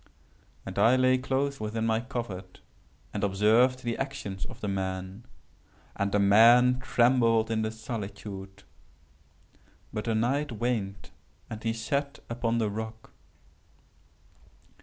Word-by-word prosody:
And - - -5
I 120 +3 +5
lay 130 0 +3
close 135 +2 -1
within 110 +1 -2
my 110 0 +2
covert 115 -7 -6 0.5
and 105 - -3
observed 110 +6 +3
the 120 -1 -2
actions 120 -9 -4
of - - -10
the 105 - -4
man. 95 +3 -4 0.7
And 100 0 -1
the 105 - +2
man 120 +5 +6
trembled 120 -3 +3
in 110 -1 +1
the 110 - -1
solitude;—but 105 -3 -7 1.4
the 115 -2 0
night 135 +5 0
waned 105 -4 -3 0.4
and 110 -1 -6
he 115 0 0
sat 140 +5 -2
upon 115 0 0
the 110 -3 0
rock. 110 - -7
115 Hz, 120 wpm, -28 LUFS, 100-125 Hz, 1.4 s, man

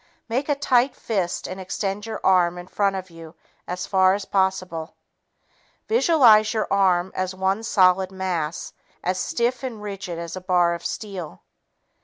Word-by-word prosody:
Make 255 +6 -2
a 290 - +3
tight 255 -2 +2
fist 190 -6 -2
and 185 +1 -6
extend 195 +3 -3
your 220 -1 -5
arm 180 -2 +3
in 175 - -8
front 195 +1 0
of 185 -1 -6
you 165 0 -12 0.3
as 180 +1 -4
far 190 -1 +4
as 200 -1 -5
possible. 185 -4 -1 0.9
Visualize 240 - +5
your 215 - +1
arm 185 -2 +2
as 185 0 -3
one 190 +3 0
solid 190 -3 +3
mass, 180 -4 -3 0.3
as 185 +1 -1
stiff 240 +4 -1
and 250 -5 -5
rigid 195 -4 -6
as 170 +1 -6
a 185 - -6
bar 180 -2 +2
of 170 0 -6
steel. 185 - -6
190 Hz, 160 wpm, -23 LUFS, 180-215 Hz, 0.9 s, Visualize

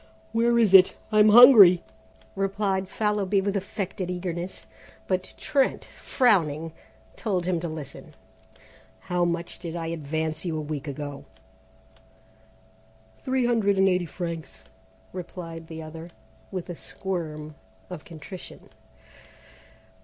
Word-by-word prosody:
"Where 235 +1 +2
is 220 -5 +3
it? 185 -1 +8 0.2
I'm 215 0 +6
hungry," 210 -6 +9 0.5
replied 195 -1 -1
Fallowby 210 -2 0
with 200 +1 -1
affected 195 -2 -4
eagerness, 180 0 -5 0.4
but 185 -1 -2
Trent, 280 -4 0
frowning, 165 - 0 0.4
told 185 -6 -2
him 180 -2 0
to 170 - -4
listen. 155 -4 -9 0.8
"How 180 -2 -1
much 170 0 -3
did 170 -2 -6
I 165 -1 -4
advance 155 +1 -3
you 165 -3 -2
a - - -2
week 150 -1 -5
ago?" 145 0 -6 1.9
"Three 260 -1 0
hundred 220 -5 +2
and 190 0 +4
eighty 180 -2 +1
francs," 170 0 -6 0.5
replied 165 -2 -8
the 160 -1 -8
other, 160 +2 -9 0.4
with 185 -2 -5
a - - -6
squirm 155 -5 -5 0.4
of 165 -4 -7
contrition. 170 +3 -11
180 Hz, 115 wpm, -25 LUFS, 160-195 Hz, 1.9 s, hungry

